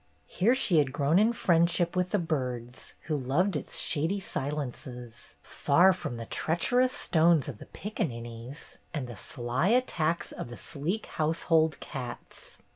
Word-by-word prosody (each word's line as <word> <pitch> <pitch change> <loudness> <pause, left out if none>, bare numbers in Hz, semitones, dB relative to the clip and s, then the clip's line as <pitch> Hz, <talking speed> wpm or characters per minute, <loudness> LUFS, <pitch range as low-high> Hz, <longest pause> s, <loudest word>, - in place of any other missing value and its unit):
Here 225 - +2
she 185 -11 +3
had 140 -3 +1
grown 145 +5 +3
in 220 +3 +4
friendship 170 -4 +2
with 180 0 +1
the 210 - +1
birds, 125 - -3
who 155 - -2
loved 150 +8 +1
its 145 - -2
shady 165 +6 0
silences, 130 -7 -6
far 180 +7 +4
from 120 -9 -5
the 115 - -6
treacherous 245 - +1
stones 165 - +3
of 105 - -6
the - - -11
piccaninnies 120 - -6 0.2
and 145 -4 -2
the 120 - -8
sly 120 - -2
attacks 175 -9 +1
of - - -6
the 120 - -8
sleek 165 - -3
household 160 0 +1
cats. 125 -4 -8
155 Hz, 145 wpm, -29 LUFS, 125-180 Hz, 0.2 s, in